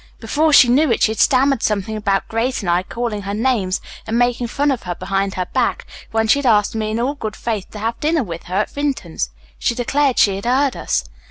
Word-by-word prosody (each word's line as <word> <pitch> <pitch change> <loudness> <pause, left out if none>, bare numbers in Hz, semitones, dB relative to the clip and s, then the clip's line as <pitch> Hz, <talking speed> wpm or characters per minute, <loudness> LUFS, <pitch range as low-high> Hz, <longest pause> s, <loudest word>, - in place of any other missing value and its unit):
Before 300 +8 +1
she 275 -3 +8
knew 270 +3 +3
it 230 - +1
she 220 - +4
had 220 - -5
stammered 270 -1 +3
something 210 0 -1
about 200 -2 0
Grace 230 +3 -1
and 180 -4 -1
I 175 +1 +2
calling 225 +2 -4
her 200 +1 -4
names 215 -5 0 0.3
and 225 - 0
making 245 0 +1
fun 285 +4 0
of 255 - -2
her 175 -1 -4
behind 195 +1 -2
her 185 - -1
back - - 0 0.2
when 225 0 0
she 280 - +4
had 280 - -1
asked 210 -3 +3
me 215 -1 -2
in 220 +1 -2
all 255 +4 0
good 220 -7 -5
faith 215 -5 -3
to - - -10
have 225 +2 -3
dinner 315 -1 +1
with 170 -5 -7
her 180 - -5
at - - -4
Vinton's. 265 - -2 0.3
She 235 - 0
declared 270 +2 +1
she 195 -2 +4
had 200 - -7
heard 265 +3 +2
us. - - -1
225 Hz, 240 wpm, -19 LUFS, 200-260 Hz, 0.3 s, she